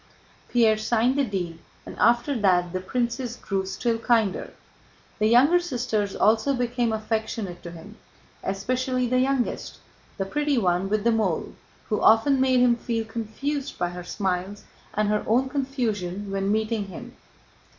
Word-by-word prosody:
Pierre 225 Hz, -3 st, +3 dB
signed 235 Hz, +3 st, +2 dB
the 285 Hz, -, +2 dB
deed 180 Hz, -7 st, -3 dB, 0.3 s
and -, -, -9 dB
after 240 Hz, +5 st, +3 dB
that 180 Hz, -3 st, +2 dB
the 185 Hz, -, -1 dB
princess 240 Hz, +3 st, -2 dB
grew 195 Hz, -5 st, -3 dB
still 230 Hz, +4 st, -1 dB
kinder. 225 Hz, -4 st, +1 dB, 0.7 s
The 215 Hz, -, +3 dB
younger 270 Hz, +10 st, +5 dB
sisters 240 Hz, -, -2 dB
also 225 Hz, +6 st, +3 dB
became 245 Hz, -1 st, 0 dB
affectionate 220 Hz, -3 st, -3 dB
to 170 Hz, -, -8 dB
him, 170 Hz, +6 st, -12 dB, 0.4 s
especially 255 Hz, +6 st, -1 dB
the 255 Hz, +1 st, +2 dB
youngest, 260 Hz, -1 st, -1 dB, 0.4 s
the 195 Hz, -, -1 dB
pretty 295 Hz, +6 st, 0 dB
one 185 Hz, -2 st, +1 dB
with 215 Hz, 0 st, 0 dB
the 235 Hz, -, +3 dB
mole, 215 Hz, -7 st, 0 dB, 0.4 s
who 210 Hz, -, 0 dB
often 260 Hz, +5 st, +5 dB
made 260 Hz, -1 st, +4 dB
him 240 Hz, -1 st, +4 dB
feel 230 Hz, -1 st, -2 dB
confused 260 Hz, +6 st, -4 dB
by 175 Hz, -, -1 dB
her 175 Hz, 0 st, -7 dB
smiles 190 Hz, +1 st, -3 dB, 0.3 s
and 215 Hz, 0 st, +1 dB
her 210 Hz, 0 st, +1 dB
own 255 Hz, +4 st, +2 dB
confusion 215 Hz, -9 st, -2 dB
when 195 Hz, 0 st, 0 dB
meeting 215 Hz, -1 st, 0 dB
him. 240 Hz, +6 st, -10 dB
225 Hz, 150 wpm, -25 LUFS, 195-250 Hz, 0.7 s, younger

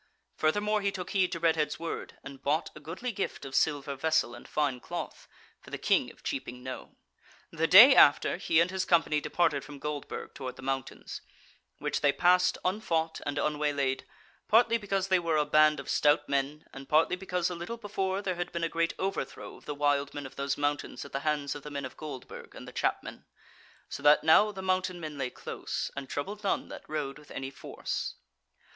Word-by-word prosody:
Furthermore 205 Hz, +7 st, +1 dB
he 200 Hz, 0 st, +1 dB
took 185 Hz, -2 st, -6 dB
heed 190 Hz, -2 st, +2 dB
to 170 Hz, -, -3 dB
Redhead's 160 Hz, -2 st, +1 dB
word 165 Hz, 0 st, -5 dB
and 135 Hz, 0 st, -10 dB
bought 150 Hz, +3 st, 0 dB
a -, -, -9 dB
goodly 170 Hz, +11 st, -5 dB
gift 195 Hz, -8 st, -4 dB
of 135 Hz, -, -8 dB
silver 145 Hz, -2 st, +1 dB
vessel 140 Hz, -4 st, +1 dB
and 120 Hz, -, -11 dB
fine 145 Hz, -4 st, 0 dB
cloth -, -, -6 dB, 0.3 s
for -, -, -15 dB
the -, -, -4 dB
King -, -, +2 dB
of -, -, -18 dB
Cheaping 125 Hz, +1 st, -4 dB
Knowe. 130 Hz, 0 st, -7 dB, 0.6 s
The 165 Hz, 0 st, 0 dB
day 225 Hz, +11 st, +10 dB
after 145 Hz, -, +6 dB
he 165 Hz, -3 st, +2 dB
and 170 Hz, +2 st, +3 dB
his 190 Hz, -1 st, -1 dB
company 165 Hz, -4 st, +2 dB
departed 145 Hz, -3 st, +1 dB
from 145 Hz, +1 st, -10 dB
Goldburg 150 Hz, 0 st, -5 dB
toward 130 Hz, -2 st, -6 dB
the -, -, -12 dB
mountains, 135 Hz, -1 st, -4 dB, 0.6 s
which -, -, -2 dB
they 145 Hz, -, +5 dB
passed 180 Hz, +3 st, +3 dB
unfought 165 Hz, -5 st, 0 dB
and 145 Hz, 0 st, -2 dB
unwaylaid: 145 Hz, -3 st, 0 dB, 0.4 s
partly 230 Hz, +1 st, +4 dB
because 195 Hz, -2 st, -1 dB
they 185 Hz, -1 st, +4 dB
were 165 Hz, -2 st, 0 dB
a 150 Hz, -, +2 dB
band 155 Hz, 0 st, +4 dB
of -, -, -8 dB
stout 150 Hz, 0 st, +3 dB
men, 140 Hz, +2 st, -1 dB
and 135 Hz, 0 st, -10 dB
partly 160 Hz, +4 st, +4 dB
because 180 Hz, -1 st, -2 dB
a -, -, -4 dB
little 175 Hz, +8 st, -5 dB
before 200 Hz, -2 st, -2 dB
there 185 Hz, -, 0 dB
had 175 Hz, 0 st, -3 dB
been 170 Hz, 0 st, -3 dB
a 165 Hz, -, +1 dB
great 165 Hz, 0 st, 0 dB
overthrow 195 Hz, +1 st, -4 dB
of -, -, -19 dB
the 145 Hz, -, -4 dB
wild 145 Hz, -1 st, +1 dB
men 145 Hz, -1 st, -5 dB
of 135 Hz, -, -10 dB
those 140 Hz, 0 st, -2 dB
mountains 145 Hz, 0 st, -2 dB
at 140 Hz, -, -11 dB
the 135 Hz, -, -2 dB
hands 145 Hz, -1 st, -1 dB
of 145 Hz, -, -8 dB
the 150 Hz, -, -8 dB
men 140 Hz, -2 st, -4 dB
of 130 Hz, -, -8 dB
Goldburg 150 Hz, -5 st, -9 dB
and -, -, -10 dB
the -, -, -10 dB
Chapmen; -, -, -2 dB, 0.6 s
so -, -, -7 dB
that 145 Hz, +1 st, +6 dB
now 210 Hz, +7 st, +6 dB
the 190 Hz, -2 st, -7 dB
mountain 185 Hz, -1 st, 0 dB
men 155 Hz, -3 st, -6 dB
lay 130 Hz, -2 st, -1 dB
close, -, -, -5 dB
and 140 Hz, -1 st, -6 dB
troubled 205 Hz, +9 st, -4 dB
none 195 Hz, -, 0 dB
that -, -, -10 dB
rode 150 Hz, -2 st, -3 dB
with 150 Hz, -, -18 dB
any 135 Hz, 0 st, -5 dB
force. 135 Hz, -, -5 dB
155 Hz, 205 wpm, -29 LUFS, 140-180 Hz, 0.6 s, day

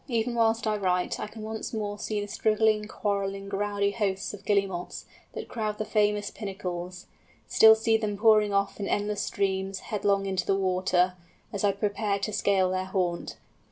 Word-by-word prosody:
Even 235 Hz, -1 st, 0 dB
whilst 230 Hz, -1 st, +2 dB
I 215 Hz, -1 st, +1 dB
write, 180 Hz, -2 st, 0 dB
I -, -, -3 dB
can 215 Hz, +1 st, -10 dB
once 220 Hz, +3 st, -5 dB
more 205 Hz, -1 st, -3 dB
see 210 Hz, 0 st, -2 dB
the 205 Hz, -, -4 dB
struggling, 215 Hz, 0 st, +1 dB
quarrelling, 195 Hz, -2 st, -2 dB
rowdy 200 Hz, 0 st, 0 dB
hosts 200 Hz, -2 st, -2 dB
of 205 Hz, -1 st, -10 dB
Guillemots 195 Hz, -4 st, -1 dB, 0.3 s
that -, -, -6 dB
crowd 215 Hz, -3 st, -3 dB
the 215 Hz, -, -2 dB
famous 210 Hz, -1 st, +1 dB
"Pinnacles"; 180 Hz, -3 st, -6 dB, 0.4 s
still 220 Hz, 0 st, +7 dB
see 225 Hz, 0 st, +2 dB
them 210 Hz, -2 st, -3 dB
pouring 215 Hz, -1 st, +5 dB
off 200 Hz, 0 st, 0 dB
in 200 Hz, -, -2 dB
endless 205 Hz, 0 st, -1 dB
streams, 195 Hz, -1 st, -1 dB
headlong 200 Hz, -1 st, +1 dB
into 190 Hz, -2 st, -2 dB
the 195 Hz, -, +3 dB
water, 185 Hz, -1 st, +2 dB, 0.4 s
as 200 Hz, -, -3 dB
I 205 Hz, -, +4 dB
prepared 200 Hz, 0 st, -1 dB
to 215 Hz, -, -2 dB
scale 195 Hz, -2 st, +2 dB
their 185 Hz, 0 st, -1 dB
haunt. 180 Hz, -2 st, -2 dB
205 Hz, 175 wpm, -27 LUFS, 195-215 Hz, 0.4 s, still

